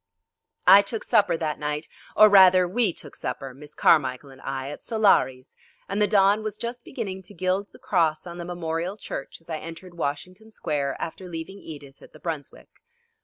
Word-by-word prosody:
I 200 - +9
took 215 +2 -4
supper 205 -7 +3
that 155 -2 -3
night, 150 +1 -2 0.3
or 215 - +9
rather 185 -3 +7
we 210 +2 +1
took 145 -3 -7
supper, 135 -2 -5
Miss 145 +3 -13
Carmichel 135 -2 +3
and 130 - -15
I, 135 0 -4
at - - -9
Solari's, 195 - +2 0.3
and 200 +2 -2
the 210 - +4
dawn 200 +1 +4
was 215 -1 -5
just 235 +1 -5
beginning 195 -7 -5
to 190 +2 -14
gild 185 +3 0
the - - -15
cross 175 -12 +1
on 175 0 -8
the - - -4
Memorial 175 +2 -3
Church 135 - -7
as 165 - -28
I 160 -2 -4
entered 165 +3 -10
Washington 180 +7 -5
Square 145 -9 -2
after 180 +2 -6
leaving 170 +4 -7
Edith 145 -5 -11
at - - -16
the - - -14
Brunswick. 155 -5 -7
175 Hz, 185 wpm, -25 LUFS, 150-200 Hz, 0.3 s, I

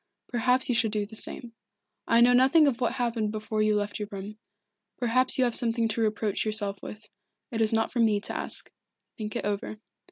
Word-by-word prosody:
Perhaps 250 +2 +2
you 250 - +1
should 225 -2 +2
do 210 -1 -1
the 220 +2 -12
same. 230 +1 -3 0.5
I 230 0 +4
know 245 +1 +6
nothing 265 +6 +5
of 260 -3 0
what 240 - +1
happened 230 -4 -1
before 215 0 -3
you 215 0 +2
left 205 0 -2
your 210 - -4
room. 200 +2 -8 0.6
Perhaps 255 +1 +1
you 260 - +3
have 240 -2 +1
something 230 -1 +2
to 225 +1 -2
reproach 215 -2 -1
yourself 210 -2 0
with. 210 0 -10 0.4
It 225 -1 -2
is 220 - +4
not 225 0 0
for 245 - -2
me 220 -3 +3
to - - -3
ask. - - -1 0.5
Think 215 +1 -5
it 235 - -3
over." 205 +1 -3
225 Hz, 210 wpm, -27 LUFS, 210-240 Hz, 0.6 s, know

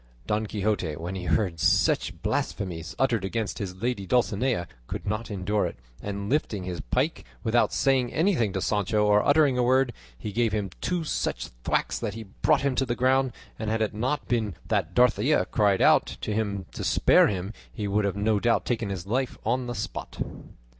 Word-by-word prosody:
Don 105 +1 0
Quixote, 100 -7 -1
when 85 +4 -5
he 95 -2 -5
heard 85 0 +1
such 80 - +2
blasphemies 85 -5 -2
uttered 120 -6 +1
against 105 +1 -2
his 95 -3 -4
lady 120 -6 -1
Dulcinea, 120 -3 +1 0.2
could - - -5
not 105 +3 -2
endure 100 +1 0
it, - - -7 0.3
and 100 0 -4
lifting 110 -7 0
his 90 -2 -4
pike, 145 +6 -1 0.2
without 120 0 +3
saying 130 -3 +2
anything 160 - +2
to 95 - -2
Sancho 105 +1 +1
or 105 0 +4
uttering 145 -3 +4
a - - +3
word, 130 0 +3 0.2
he 105 - -5
gave 115 +1 +1
him 100 -3 -1
two 180 -2 -1
such 155 - -2
thwacks - - 0
that 110 -3 -3
he 115 - -6
brought 95 -2 +1
him 140 -1 +1
to 135 - +2
the 120 - 0
ground; 130 +1 +2 0.3
and 110 0 -2
had 110 0 +1
it 105 - -2
not 130 +7 -2
been 110 -5 0
that - - 0
Dorothea 125 +3 +4
cried 105 -6 +2
out - - +5
to 105 - -2
him 100 -3 -2
to - - -5
spare - - +5
him 95 +1 -3 0.2
he 105 -2 -4
would 105 +2 +1
have 100 -1 0
no 105 +1 +1
doubt 120 +2 +2
taken 115 -4 -1
his 95 -2 -4
life 125 +5 -1
on 125 +2 0
the 120 - -4
spot. 100 - -5
110 Hz, 195 wpm, -26 LUFS, 100-125 Hz, 0.3 s, out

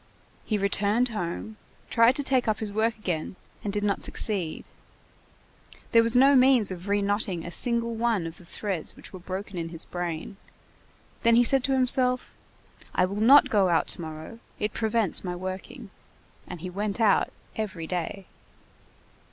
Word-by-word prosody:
He 215 - 0
returned 205 +4 +1
home, 215 +1 -5 0.3
tried 230 +2 +5
to 285 - -1
take 260 -3 +1
up 215 - +1
his 215 -2 -5
work 220 +2 0
again, 180 -4 -3 0.3
and 205 - -2
did 205 0 -2
not 200 -1 0
succeed; 185 -7 0 1.3
there 230 - +6
was 230 +1 +4
no 275 +2 +6
means 255 -5 +5
of 180 +1 -7
re 205 0 +1
knotting 200 -4 -1
a 170 - -6
single 235 +2 +2
one 225 -5 0
of 165 0 -7
the 185 - -15
threads 185 -2 -4
which - - -14
were 185 - -8
broken 185 +1 -6
in 165 0 -4
his 165 -1 -9
brain; 175 +1 -5 0.8
then 230 0 +4
he 240 - +6
said 265 +2 +2
to 270 - +1
himself: 255 -1 +2 0.6
"I 180 - +4
will 200 +3 -4
not 275 +6 +7
go 200 -4 +3
out 170 - +2
to - - -5
morrow. 160 +7 -8 0.2
It 210 0 -2
prevents 220 -3 0
my 180 -1 -4
working." 190 +5 -7 0.6
And 180 -3 -8
he 185 - -5
went 205 +3 -3
out 215 -4 +3 0.2
every 190 -7 -4
day. 180 +3 -4
205 Hz, 170 wpm, -26 LUFS, 180-230 Hz, 1.3 s, not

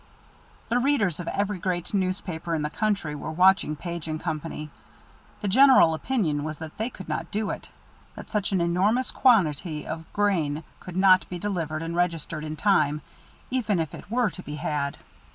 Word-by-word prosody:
The 245 - +2
readers 240 - +2
of 175 - -5
every 200 0 -1
great 175 0 -2
newspaper 185 -3 -1
in 155 - -1
the 150 - -2
country 205 -8 -1
were 145 - -5
watching 180 -2 +4
Page 170 0 -5
& - - -11
Company. 155 -2 -4 0.7
The 205 - -2
general 255 -5 +7
opinion 160 - 0
was 155 0 -4
that 160 0 -8
they 225 +3 0
could 190 -6 -11
not 165 0 -3
do 215 +1 -1
it, - - -7 0.5
that - - -10
such 210 -2 0
an 190 -3 +2
enormous 195 +9 +2
quantity 165 - +2
of 160 +1 -6
grain 165 -7 +1 0.2
could 180 -1 -8
not 185 -1 +5
be 180 - -4
delivered 165 -5 -2
and 165 +1 -4
registered 165 -3 -1
in 155 0 -4
time, 150 -6 +2 0.5
even 220 -7 +1
if 160 -2 -2
it - - -10
were 235 -2 +1
to 185 - -8
be 150 -4 -7
had. 150 -3 -2
175 Hz, 180 wpm, -26 LUFS, 155-205 Hz, 0.7 s, general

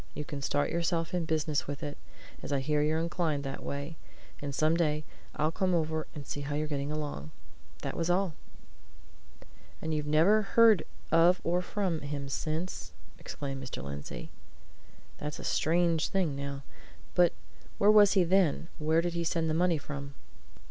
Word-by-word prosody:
'You 150 - -4
can 140 0 -5
start 145 +1 0
yourself 170 0 0
in 175 -2 0
business 155 -2 0
with 145 +2 -5
it, 145 -1 -4 0.5
as - - -6
I 140 - +2
hear 150 +2 +1
you're 155 +1 +2
inclined 165 -3 0
that 135 -1 -5
way, 140 +3 -5 0.4
and 145 - -3
some 155 +3 +3
day 155 -3 +1 0.3
I'll 155 +1 +1
come 185 +1 +1
over 160 -1 -1
and 145 -2 -7
see 145 - -4
how 145 +1 -3
you're 155 +1 0
getting 145 -1 -2
along.' 145 - -4 0.5
That - - -3
was 165 0 -1
all!" 180 -1 +2 1.5
"And 160 0 -3
you've 150 -1 -1
never 165 +9 +5
heard 215 -2 +5 0.3
of 175 +2 +5
or 175 +2 +1
from 180 -3 -1
him 140 -1 -4
since?" 160 +6 -3 0.3
exclaimed 135 -2 -5
Mr. 130 - -6
Lindsey. 70 -3 -6 0.9
"That's 150 0 -4
a - - -8
strange 165 0 +2
thing, 180 -7 0
now. 140 0 -5 0.5
But 175 -1 +5 0.4
where 205 +1 +6
was 205 -2 +7
he 190 -2 +5
then? 175 -2 +2
Where 160 +2 +3
did 175 0 -2
he 170 0 -1
send 165 -1 0
the - - +1
money 175 0 +3
from?" 140 -1 -7
155 Hz, 170 wpm, -30 LUFS, 145-175 Hz, 1.5 s, was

